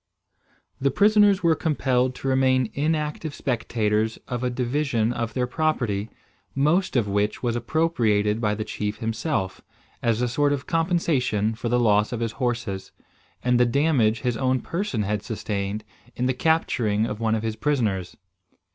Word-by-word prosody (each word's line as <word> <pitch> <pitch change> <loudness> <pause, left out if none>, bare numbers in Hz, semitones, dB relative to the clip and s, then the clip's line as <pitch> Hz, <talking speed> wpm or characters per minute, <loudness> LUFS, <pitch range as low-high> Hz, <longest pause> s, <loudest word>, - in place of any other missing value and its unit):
The 140 - +2
prisoners 205 - +4
were 165 -1 +5
compelled 130 -5 0
to 135 - -6
remain 130 -3 +2
inactive 150 0 -1
spectators 110 -3 0
of 125 0 -3
a 125 - +1
division 125 -2 0
of 115 -2 -3
their 125 -1 +1
property, 125 -8 -1 0.5
most 155 +7 +2
of 120 -5 +2
which 100 +3 -1
was 120 -1 0
appropriated 115 -6 +1
by 105 -2 +1
the 110 - -3
chief 105 0 -3
himself, 115 - -2 0.4
as 115 -2 +1
a - - +2
sort 145 +4 +1
of 135 -2 -3
compensation 150 - +1
for 120 +1 -4
the 125 +1 +2
loss 105 -2 +3
of 120 - -3
his 115 -1 -1
horses, 115 -7 -3 0.5
and 125 -1 +3
the - - +6
damage 120 -5 +2
his 120 -1 -1
own 130 0 +1
person 170 - -2
had 105 +1 -1
sustained 105 -1 -3 0.3
in 125 - -1
the 130 - +2
capturing 120 -8 +1
of 105 -2 -4
one 110 -1 +1
of 110 - -3
his 110 -1 -2
prisoners. 110 -9 -1
120 Hz, 160 wpm, -24 LUFS, 110-140 Hz, 0.5 s, the